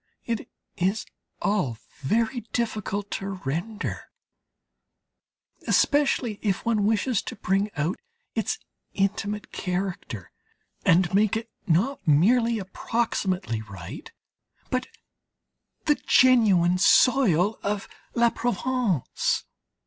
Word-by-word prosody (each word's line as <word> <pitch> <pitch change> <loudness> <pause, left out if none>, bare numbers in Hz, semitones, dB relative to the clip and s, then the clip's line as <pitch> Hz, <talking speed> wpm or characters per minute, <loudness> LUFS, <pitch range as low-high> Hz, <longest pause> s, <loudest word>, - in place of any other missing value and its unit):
It 230 -2 -3 0.3
is 195 +5 0 0.4
all 165 - +1 0.2
very 225 - +1
difficult 215 -3 -2
to 195 - -3 0.2
render, 175 +11 -3 1.6
especially 270 -7 +2
if 200 -1 -1
one 215 -3 +2
wishes 225 +1 +1
to - - -7
bring 195 0 0
out 155 +5 -1 0.3
its - - -1 0.4
intimate 205 +1 -1
character, 180 - -4 0.5
and 175 +1 +4
make 210 +2 +3
it 225 0 -7 0.2
not 195 - +2
merely 230 - +4
approximately 190 - -1
right, 95 -5 -9 0.6
but 255 0 0 1.0
the 300 - +5
genuine 200 -9 +5
soil 215 - +4
of 205 0 -2 0.3
La 235 -1 +4
Provence. 240 - 0
205 Hz, 95 wpm, -26 LUFS, 180-235 Hz, 1.6 s, the